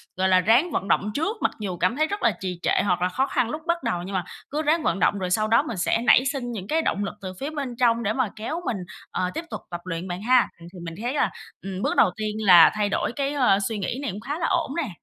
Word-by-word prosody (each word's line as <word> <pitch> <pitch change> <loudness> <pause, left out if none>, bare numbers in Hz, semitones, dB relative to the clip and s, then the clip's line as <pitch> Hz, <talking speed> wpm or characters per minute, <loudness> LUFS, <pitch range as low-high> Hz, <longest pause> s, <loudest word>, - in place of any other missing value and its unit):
gọi 190 0 +1
là, 185 - +5
ráng 240 - +3
vận 195 - -2
động 210 +1 +1
trước. 330 - -1
Mặc - - +2
dù 190 -4 -4
cảm 230 - +1
thấy 310 +3 +1
rất 405 +5 -4
là 230 - +5
trì 180 -2 -4
trệ - - +2
hoặc 180 -2 +1
là 180 - +2
khó 265 +9 0
khăn 235 - 0
lúc 305 +4 -4
bắt 340 0 0
đầu, 175 - -1
nhưng 195 +2 -7
mà 185 - 0 0.3
cứ 300 +2 -2
ráng 315 +2 +1
vận 195 - 0
động 205 - +2
rồi 185 -1 -2
sau 215 +4 +1
đó 230 +5 +4
mình 235 -9 -5
sẽ 180 +5 +1
nảy 245 +2 +5
sinh 265 -3 -2
những 200 -4 -6
cái 320 +1 +1
động 205 -9 -1
lực 200 - -4
từ 185 -1 -6
phía 280 - -3
bên 275 -5 -4
trong 235 -1 +3
để 210 +1 0
mà 250 -3 0
kéo 305 +11 -4
mình, 225 - -1 0.3
ờ, 180 - -1
tiếp 335 - -4
tục - - -5
tập 175 0 -5
luyện 180 0 -5
bạn 180 +1 -5
ha? 250 +3 +4
Ừm, 170 - -12
thì 180 - -10
mình 165 - -6
thấy 245 +3 -2
là, - - +1 0.3
ừm, 190 0 -5
bước - - 0
đầu 180 - +5
tiên 215 0 -3
là 175 -4 +8
thay 210 -1 0
đổi 205 - -1
cái, 280 0 -1
ơ, 250 -9 +4
suy 220 - -3
nghĩ 205 +6 -3
này 275 -8 -2
cũng 205 - -8
khá 290 +7 -4
là 335 - 0
ổn 335 -6 0
nè. 310 -8 -1
225 Hz, 300 wpm, -24 LUFS, 190-280 Hz, 0.3 s, là